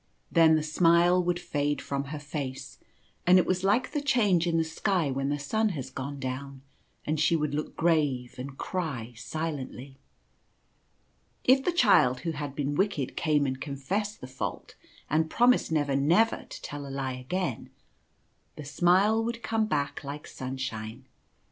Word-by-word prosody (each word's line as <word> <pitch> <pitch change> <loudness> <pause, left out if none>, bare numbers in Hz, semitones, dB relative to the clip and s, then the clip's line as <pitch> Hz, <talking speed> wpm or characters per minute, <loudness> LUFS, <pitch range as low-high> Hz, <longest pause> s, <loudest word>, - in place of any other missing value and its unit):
Then 165 -2 +6
the 155 - +1
smile 170 +3 +4
would 175 0 0
fade 145 -3 -1
from 140 0 -3
her 150 +2 -6
face; 145 -3 -6 0.5
and 180 +1 +8
it 180 - +4
was 185 0 0
like 205 +6 +2
the 295 - -1
change 210 -11 +2
in 165 -1 +1
the 165 - +3
sky 160 -1 0
when 135 +1 -1
the 145 - 0
sun 220 +10 0
has 130 -1 -6
gone 140 +2 -5
down, 135 +1 -5 0.4
and 155 0 -1
she 160 +2 +3
would 150 -2 -1
look 150 +1 -3
grave, 145 -7 +1
and 135 +1 -7
cry 140 -11 -4
silently. 140 -2 -5 1.4
If 265 +1 +5
the 360 - +1
child 165 - +4
who 165 - -2
had 145 -2 -5
been 145 0 -1
wicked 155 -6 -1
came 150 -3 +2
and 130 -1 -3
confessed 185 +9 -3
the - - -6
fault 130 +1 -5 0.3
and 160 +1 +1
promised 245 -3 +3
never 145 -3 +1
never 170 +12 +3
to - - -9
tell 145 -1 -6
a - - -7
lie 135 -1 -3
again, 130 +2 -3 0.9
the 150 - -8
smile 190 +9 +3
would 235 0 -4
come 220 -1 0
back 145 -5 -2
like 145 +1 -6
sunshine. 125 -3 -6
150 Hz, 165 wpm, -28 LUFS, 135-180 Hz, 1.4 s, and